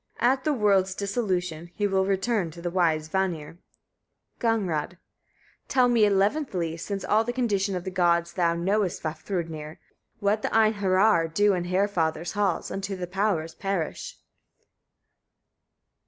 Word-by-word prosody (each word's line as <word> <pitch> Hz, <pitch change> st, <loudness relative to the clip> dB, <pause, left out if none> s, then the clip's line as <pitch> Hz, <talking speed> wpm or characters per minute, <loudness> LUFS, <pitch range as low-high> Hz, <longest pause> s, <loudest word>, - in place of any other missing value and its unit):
At 260 Hz, +2 st, +2 dB
the 305 Hz, -, +2 dB
world's 200 Hz, -7 st, +2 dB
dissolution, 180 Hz, -6 st, -2 dB
he 205 Hz, -, 0 dB
will 190 Hz, -1 st, +1 dB
return 195 Hz, -1 st, 0 dB
to 170 Hz, +2 st, -11 dB
the 175 Hz, -, -2 dB
wise 160 Hz, -4 st, +1 dB
Vanir. 170 Hz, -3 st, -2 dB, 0.8 s
Gagnrâd. 190 Hz, -9 st, 0 dB
40. -, -, -23 dB, 0.7 s
Tell 255 Hz, -2 st, +3 dB
me 230 Hz, -3 st, +4 dB
eleventhly, 195 Hz, -, 0 dB
since 195 Hz, +4 st, -5 dB
all 215 Hz, +1 st, +3 dB
the 240 Hz, -, -2 dB
condition 205 Hz, -6 st, 0 dB
of 180 Hz, -, -3 dB
the 190 Hz, -, -5 dB
gods 170 Hz, -2 st, +2 dB
thou 170 Hz, -2 st, +1 dB
knowest, 190 Hz, +2 st, 0 dB
Vafthrûdnir! 160 Hz, -1 st, -4 dB, 0.4 s
what 205 Hz, +2 st, +1 dB
the -, -, -1 dB
Einheriar 200 Hz, -5 st, +3 dB
do 205 Hz, +4 st, +3 dB
in 175 Hz, -1 st, -2 dB
Haerfather's 175 Hz, -4 st, 0 dB
halls, 200 Hz, -4 st, -1 dB
until 195 Hz, 0 st, -4 dB
the 180 Hz, -, -3 dB
powers 180 Hz, -3 st, -1 dB
perish? 195 Hz, -3 st, -3 dB
190 Hz, 140 wpm, -26 LUFS, 170-205 Hz, 0.8 s, me